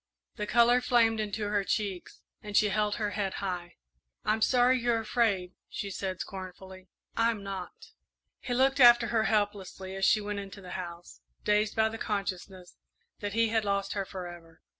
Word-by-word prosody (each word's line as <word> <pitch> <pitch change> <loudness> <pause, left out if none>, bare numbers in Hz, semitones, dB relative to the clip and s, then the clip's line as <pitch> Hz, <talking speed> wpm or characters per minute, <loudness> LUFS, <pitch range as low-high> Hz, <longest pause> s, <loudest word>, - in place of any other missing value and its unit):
The 210 - -4
colour 240 +2 +5
flamed 230 -3 +3
into 210 0 -2
her 205 -1 +1
cheeks, 195 -2 -3 0.2
and 210 -1 -2
she 210 - +4
held 210 +1 +1
her 210 -2 -2
head 195 -1 -2
high. 180 -3 -4 0.5
"I'm 220 +1 +1
sorry 250 +2 +4
you're 235 -1 +1
afraid," 210 -5 0 0.2
she 200 -1 -5
said, 190 -1 -4
scornfully, 185 -1 -8 0.3
"I'm 230 -3 +1
not!" 195 -2 -7 0.5
He 245 - -3
looked 265 +2 +3
after 240 -2 +7
her 225 -2 +2
helplessly 200 -3 -1
as 195 - -4
she 215 - +5
went 205 0 -4
into 195 0 -8
the 185 -2 -10
house, 175 -1 -7 0.2
dazed 210 0 +2
by 220 -1 +3
the 225 0 -7
consciousness 190 -3 -4 0.4
that 205 -1 -4
he 230 0 +2
had 225 -1 +1
lost 200 -1 -1
her 200 - -1
forever. 175 -3 -9
205 Hz, 170 wpm, -29 LUFS, 190-225 Hz, 0.5 s, after